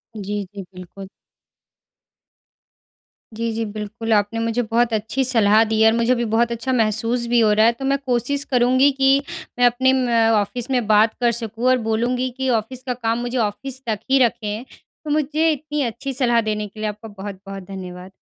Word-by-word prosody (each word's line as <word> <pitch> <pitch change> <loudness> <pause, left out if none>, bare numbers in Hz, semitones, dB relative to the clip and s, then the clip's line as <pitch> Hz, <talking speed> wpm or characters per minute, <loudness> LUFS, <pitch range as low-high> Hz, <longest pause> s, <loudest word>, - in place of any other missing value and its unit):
जी, 205 0 -4
जी। 200 - -7
बिल्कुल। 185 +2 -10 2.3
जी, 230 +1 -3
जी। 225 +1 -2
बिल्कुल, 215 +2 -4
आपने 210 +2 +1
मुझे 230 +1 0
बहुत 230 +1 0
अच्छी 220 +5 -1
सलाह 220 -3 +4
दी 220 0 0
है 220 - +7
और - - 0
मुझे 235 +2 +2
भी 240 0 -1
बहुत 235 +1 +2
अच्छा 235 +3 -2
महसूस 230 +1 +1
भी 240 0 +3
हो 220 -2 +4
रहा 215 +1 +4
है 230 - +5
तो 270 +3 -7
मैं 275 +1 +2
कोशिश 255 +3 0
करूँगी 255 +2 +4
कि 270 +1 +4 0.4
मैं 245 - +5
अपने 260 +2 +3
म 255 -2 0 0.3
ऑफ़िस 230 +5 -5
में 250 -3 +1
बात 215 +1 +4
कर 240 -1 +3
सकूँ 225 0 -4
और 255 - +4
बोलूँगी 245 +3 0
कि 265 0 -1
ऑफ़िस 240 +2 -2
का 250 - 0
काम 230 -2 -1
मुझे 245 +1 -3
ऑफ़िस 245 +4 -3
तक 215 -2 -1
ही 270 - +5
रखें। 220 -1 -3 0.4
तो 305 - -7
मुझे 305 +2 +1
इतनी 300 0 -3
अच्छी 250 +3 -4
सलाह 240 -3 +2
देने 210 -1 -3
के 210 +2 -15
लिए 215 0 -1
आपका 210 +2 -9
बहुत-बहुत 195 -1 -8
धन्यवाद। 185 -1 -8
230 Hz, 190 wpm, -21 LUFS, 215-255 Hz, 2.3 s, है